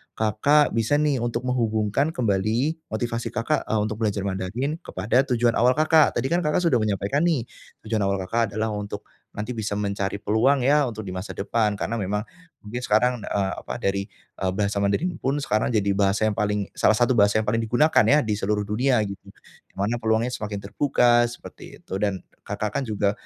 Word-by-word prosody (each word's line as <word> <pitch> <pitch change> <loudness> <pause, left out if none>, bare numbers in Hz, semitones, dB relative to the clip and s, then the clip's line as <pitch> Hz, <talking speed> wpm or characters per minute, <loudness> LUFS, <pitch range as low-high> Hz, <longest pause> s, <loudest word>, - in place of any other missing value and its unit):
Kakak 115 +8 +3
bisa 115 +5 +1
nih 145 -3 +1
untuk 120 +1 -2
menghubungkan 115 +2 0
kembali 120 +9 0
motivasi 115 +1 -3
Kakak, 125 +7 -1
e - - -2
untuk 110 0 -4
belajar 105 -3 -1
Mandarin 105 - -3
kepada 125 +4 +1
tujuan 120 0 +2
awal 125 +2 +4
Kakak, 155 0 +4
tadi 135 - -1
kan 170 - +3
Kakak 150 +2 +1
sudah 165 -8 +3
menyampaikan 105 - 0
nih 160 -9 +1 0.4
tujuan 110 0 -1
awal 100 0 +1
Kakak 115 +1 -1
adalah 110 +1 -1
untuk 105 0 -5 0.3
nanti 105 +4 -4
bisa 110 -3 -3
mencari 100 -1 -2
peluang 125 +6 +2
ya, 145 +1 +3
untuk 110 -2 -6
di 95 - -6
masa 95 +2 -6
depan, 105 +1 0
karena 115 +2 -3
memang 105 +2 -2 0.4
mungkin 110 +4 -5
sekarang, 125 +1 +2
e - - -1 0.2
apa, - - -6
dari, 100 0 -1 0.3
e - - -5
bahasa 100 0 -1
Mandarin 100 - +1
pun 135 +2 0
sekarang 110 - +1
jadi 100 -2 +2
bahasa 100 +1 +1
yang 110 - +3
paling 105 -1 -1
salah 110 - +3
satu 120 +3 +2
bahasa 100 +1 +4
yang - - -11
paling 115 +1 +1
digunakan 120 +8 +3
ya, 150 -1 +4
di 110 - -2
seluruh 105 +1 0
dunia 120 +6 +1
gitu. 100 -2 -6 0.5
Di - - -33
mana 105 +5 -1
peluangnya 110 +2 +1
semakin 105 -4 -4
terbuka, 120 +2 +3
seperti 120 - -11
itu. - - -9
Dan, 100 -3 -1 0.2
Kakak 105 +1 -3
kan 140 - -2
juga 105 -2 +1
110 Hz, 190 wpm, -24 LUFS, 105-125 Hz, 0.5 s, awal